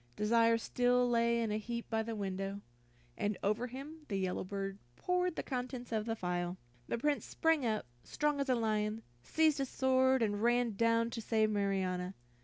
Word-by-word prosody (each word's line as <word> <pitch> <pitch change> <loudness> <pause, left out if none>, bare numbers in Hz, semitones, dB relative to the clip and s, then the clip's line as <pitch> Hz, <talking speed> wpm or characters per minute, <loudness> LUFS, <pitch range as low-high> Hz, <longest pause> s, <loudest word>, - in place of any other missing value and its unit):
Desire 230 +2 +4
still 245 +1 +2
lay 235 0 +2
in 220 - -1
a 210 - 0
heap 235 +2 -5
by 225 -1 0
the 225 0 -4
window, 195 0 -3 0.6
and 205 -1 -1
over 215 +5 +1
him 275 +6 -8
the 200 - -2
yellow 185 -1 -1
bird 195 +1 -4 0.2
poured 360 - 0
the - - -3
contents 250 -2 -4
of 220 0 -1
the 225 - 0
phial. 180 -2 -2 0.3
The - - -1
Prince 290 +4 0
sprang 320 -6 +1
up, 215 - -1 0.2
strong 295 -1 0
as 280 -1 -1
a 255 - +4
lion, 215 -1 0 0.2
seized 310 - +2
his 270 -1 -1
sword, 260 -1 +3
and 205 -1 0
rushed 240 -1 +2
down 230 +1 +2
to 230 - -4
save 220 -1 +2
Marianna. 190 -2 -1
230 Hz, 185 wpm, -34 LUFS, 205-250 Hz, 0.6 s, Desire